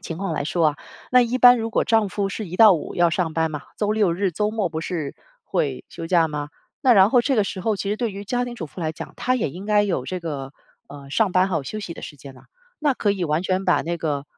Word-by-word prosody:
情 165 - -6
况 195 +1 -2
来 - - -2
说 165 +1 +2
啊， 150 - -4 0.3
那 250 - +6
一 245 +1 +1
般 245 -1 +7
如 225 0 -2
果 - - +1
丈 220 -2 +2
夫 200 0 -2
是 205 +2 -5
一 180 +1 -7
到 220 -3 +8
五 165 - -3
要 175 -1 +3
上 165 -2 -1
班 160 -1 +1
嘛， 150 -1 -5
周 210 -1 0
六 210 -5 +2
日 190 +2 0
周 210 +5 -1
末 215 -4 -1
不 160 -1 -4
是 160 -4 -4 0.3
会 135 -4 -2
休 165 - -7
假 165 -2 +3
嘛。 145 -1 -4 0.3
那 265 -3 +5
然 195 -2 +6
后 245 - +5
这 265 +2 0
个 210 - +3
时 195 -1 -5
候 215 +2 0
其 200 +1 -3
实 210 - 0
对 235 0 -1
于 200 +1 -7
家 245 +4 -1
庭 245 -1 -6
主 170 -9 -6
妇 165 - -11
来 160 -1 -2
讲， - - -9
她 255 - 0
也 230 - -1
应 185 +7 -9
该 210 -1 +4
有 185 -11 -1
这 185 +6 -4
个， 145 -5 -5 0.4
呃， 140 -1 -11
上 200 +5 +1
班， 185 +1 +3
还 180 - 0
有 150 - -2
休 215 - -5
息 180 - -6
的 - - -10
时 145 - -8
间 135 0 -12
呐。 130 - -17 0.3
那 295 -3 +1
可 210 - 0
以 195 -3 -1
完 155 +1 0
全 185 0 -1
把 180 - +3
那 170 +1 -3
个， 145 -3 -2
185 Hz, 310 characters per minute, -23 LUFS, 160-215 Hz, 0.4 s, 到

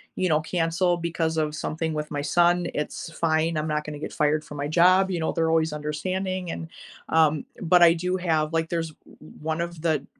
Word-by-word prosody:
you 185 - 0
know, 155 -1 +3
cancel 170 +2 +1
because 165 -1 -1
of 155 -1 0
something 160 +1 -3
with 150 0 -3
my 145 -1 -3
son, 175 +2 +3
it's 150 +2 -4
fine. 160 0 +1
I'm 155 - -1
not 150 -1 -1
gonna 150 -1 -7
get - - -5
fired 150 +1 +1
from 150 - -9
my 140 - -2
job, 185 +3 +4
you 175 - -1
know, 160 - 0
they're 165 -1 +1
always 160 -1 +2
understanding, 185 +5 -3
and, 165 - -6 0.4
um, 155 -2 +3 0.2
but 175 0 +5
I 165 -1 +8
do 180 +2 -2
have 160 -4 0
like, 165 0 0
there's 165 -1 -2
o - - -22 0.5
one 160 +2 -2
of 170 -2 -5
the 155 -4 +1
160 Hz, 210 wpm, -25 LUFS, 155-175 Hz, 0.5 s, I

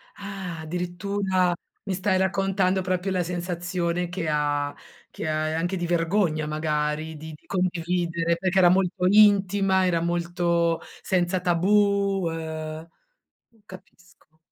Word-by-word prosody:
Ah, 195 -4 -6
addirittura! 180 +2 -1 0.3
Mi 195 - -2
stai 190 0 +1
raccontando 190 0 +1
proprio 185 +1 -1
la 185 -1 +1
sensazione 175 0 -2
che 180 -2 -3
ha 145 -1 0 0.4
che - - -6
ha 155 0 0
uhm, 155 - -2
anche 175 +3 -1
di 175 -2 -2
vergogna 165 -2 +1
magari, 155 0 -2
di 160 +1 -9
di - - -24
condividere, 170 -2 0
perché 190 +1 -1
era 175 - +7
molto 180 0 +1
intima, 195 -2 +4
era 170 -2 +1
molto 170 -1 0 0.2
senza 180 0 0
tabù 195 +1 +2
uhm, 160 0 -5 0.8
capisco. 180 -4 -17
175 Hz, 125 wpm, -25 LUFS, 165-190 Hz, 0.8 s, era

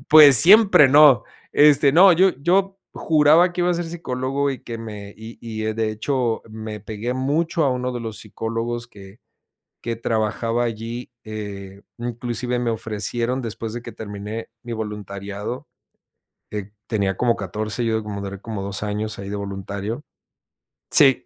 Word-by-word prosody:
Pues, 150 -4 +9
siempre, 195 - +7
no. 145 -2 +7 0.3
Este, 145 -1 +5
no, 180 +3 +8
yo 185 +3 +5
yo 190 +4 +1
juraba 160 +3 +4
que 180 - -3
iba 175 0 +2
a 175 - +1
ser 175 0 -2
psicólogo, 140 -4 -2
y 135 - -6
que 115 - -6
me 105 -3 -8
y 110 +1 -11
y, 110 -2 -5
eh, 110 0 -1
de 110 -1 -1
hecho 120 +1 -1
me 110 -1 -7
pegué 110 +4 -4
mucho 155 +5 0
a 135 - +2
uno 125 0 -2
de 120 - -4
los 110 -2 -6
psicólogos, 115 +2 -4
que 100 -2 -15 0.6
que 115 - -2
trabajaba 115 +1 -1
allí. 115 +2 -5
Eh, 100 -2 -7 0.2
inclusive 120 +1 -3
me 120 -1 0
ofrecieron 115 +3 -2
después 115 -1 -5
de 120 - -5
que 120 - -9
terminé 105 +1 -7
mi 120 - -7
voluntariado, 105 +1 -6 0.8
eh, 105 -1 -5 0.2
tenía 100 -4 -1
como 120 -2 +2
14, 110 +3 -3
yo, 110 -1 0
como 100 -1 -5
duré 100 -1 -6
como 110 -2 -6
2 100 +1 -4
años 105 +1 -3
ahí 100 0 -6
de 105 - -3
voluntario. 100 +4 -5 0.9
Sí. 135 -4 +6
115 Hz, 160 wpm, -22 LUFS, 105-130 Hz, 0.9 s, Pues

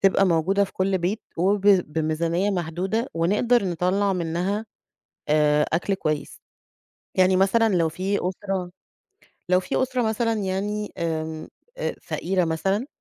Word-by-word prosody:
تبقى 195 0 +4
موجودة 185 +4 +2
في 195 - -11
كل 190 0 0
بيت 185 +5 -2
وب 195 +4 +2
بميزانية 170 0 +2
محدودة 185 +6 -2
ونقدر 205 +8 +2
نطلَّع 185 +3 +1
منها 180 +5 -2 0.6
آآ، 150 0 +4
أكل 175 +5 +1
كويس 155 -5 -3 0.8
يعني 185 0 +4
مثلًا 205 +3 +3
لو 165 -2 +2
في 190 +5 -1
أسرة 190 -1 -4 0.8
لو 180 0 +4
في 185 - -1
أسرة 255 -1 0
مثلًا 225 +1 0
يعني 205 0 -2
آمم، 160 -2 -3 0.3
أ - - -2
فقيرة 185 0 -1
مثلًا، 195 - -1
185 Hz, 130 wpm, -24 LUFS, 170-205 Hz, 0.8 s, تبقى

